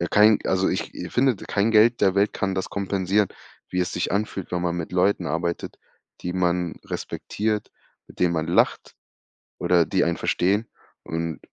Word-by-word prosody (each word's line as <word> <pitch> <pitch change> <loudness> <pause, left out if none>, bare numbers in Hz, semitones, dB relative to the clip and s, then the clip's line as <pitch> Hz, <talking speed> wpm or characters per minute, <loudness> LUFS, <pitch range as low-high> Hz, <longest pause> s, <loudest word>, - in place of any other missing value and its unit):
ja, 85 - -1
kein 105 0 +6
also 95 0 +2
ich - - -2 0.2
finde, 125 -2 +3
kein 105 +3 0
Geld 115 +2 +5
der 95 0 +3
Welt 100 +1 +3
kann 95 -1 -1
das 95 - -2
kompensieren, 100 0 0 0.4
wie 90 - -2
es 90 - -1
sich - - -2
anfühlt, 100 -2 -2
wenn 90 0 -1
man 85 -1 -1
mit 85 -2 -4
Leuten 90 0 +2
arbeitet, 85 +1 -3 0.4
die 90 - -3
man 90 -1 0
respektiert, 105 0 -3 0.4
mit - - -16
denen 90 -1 +3
man 80 0 -1
lacht 85 - +1 0.7
oder 85 -2 +3
die - - +1
einen - - 0
verstehen 100 +5 +1 0.4
und 80 0 -3
95 Hz, 170 wpm, -24 LUFS, 85-105 Hz, 0.7 s, kein